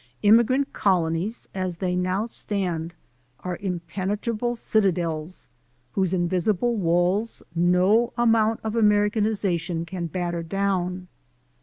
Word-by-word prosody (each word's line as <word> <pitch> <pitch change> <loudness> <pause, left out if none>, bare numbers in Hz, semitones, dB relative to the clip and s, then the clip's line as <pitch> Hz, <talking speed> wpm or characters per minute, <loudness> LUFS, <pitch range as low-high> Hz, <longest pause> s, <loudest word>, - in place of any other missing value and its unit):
Immigrant 235 +6 +4
colonies 180 +2 0
as 185 -2 -3
they 180 0 -1
now 185 +3 0
stand 180 -7 -3 0.5
are 180 -1 -4
impene 180 0 -4
trable 235 +2 -2
citadels, 175 -6 -1 0.4
whose 190 -3 0
invisible 185 +5 +1
walls 180 +3 0
no 180 +7 +3
amount 225 -2 +3
of 220 0 -3
Americanization 205 -5 +1
can 170 0 -4
batter 175 0 -3
down. 185 0 -2
185 Hz, 105 wpm, -24 LUFS, 175-215 Hz, 0.5 s, Immigrant